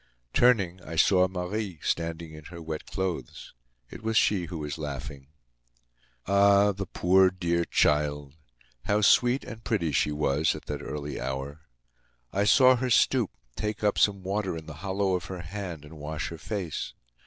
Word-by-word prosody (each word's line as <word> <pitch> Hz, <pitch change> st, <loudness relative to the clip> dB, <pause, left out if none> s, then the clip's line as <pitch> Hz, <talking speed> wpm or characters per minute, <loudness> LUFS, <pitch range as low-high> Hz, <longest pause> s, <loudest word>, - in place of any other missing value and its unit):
Turning, 100 Hz, -8 st, +3 dB
I 85 Hz, -1 st, -8 dB
saw 90 Hz, +3 st, +4 dB
Marie, 95 Hz, +1 st, -4 dB
standing 85 Hz, -1 st, -2 dB
in 75 Hz, -1 st, -11 dB
her 85 Hz, +2 st, -9 dB
wet 80 Hz, -1 st, -6 dB
clothes. 90 Hz, -10 st, -4 dB, 0.4 s
It -, -, -9 dB
was 110 Hz, 0 st, 0 dB
she 95 Hz, -5 st, +3 dB
who 85 Hz, 0 st, -6 dB
was 75 Hz, 0 st, -5 dB
laughing. 70 Hz, -2 st, -6 dB, 1.0 s
Ah! 100 Hz, +1 st, +5 dB
the 100 Hz, -1 st, -5 dB
poor, 95 Hz, +2 st, +4 dB
dear 85 Hz, -2 st, -1 dB
child! 75 Hz, -2 st, +1 dB, 0.5 s
How 105 Hz, +1 st, +2 dB
sweet 125 Hz, +5 st, +4 dB
and 110 Hz, 0 st, -9 dB
pretty 85 Hz, -8 st, 0 dB
she 75 Hz, +2 st, +1 dB
was 75 Hz, +1 st, +1 dB
at 75 Hz, -, -10 dB
that 75 Hz, 0 st, -4 dB
early 75 Hz, 0 st, -5 dB
hour! 65 Hz, +4 st, -4 dB, 0.7 s
I 100 Hz, +1 st, +1 dB
saw 130 Hz, +5 st, +6 dB
her 130 Hz, +1 st, -1 dB
stoop, 120 Hz, -2 st, +3 dB, 0.3 s
take 105 Hz, 0 st, -3 dB
up 105 Hz, -, +2 dB
some 100 Hz, -2 st, +2 dB
water 95 Hz, -2 st, -2 dB
in 80 Hz, -, -9 dB
the 75 Hz, -2 st, -9 dB
hollow 95 Hz, 0 st, 0 dB
of 90 Hz, -2 st, -1 dB
her 90 Hz, -1 st, -6 dB
hand, 85 Hz, -3 st, -6 dB
and 75 Hz, +1 st, -12 dB
wash 75 Hz, +1 st, -4 dB
her 85 Hz, -, -8 dB
face. 95 Hz, -6 st, -4 dB
90 Hz, 165 wpm, -27 LUFS, 75-100 Hz, 1.0 s, saw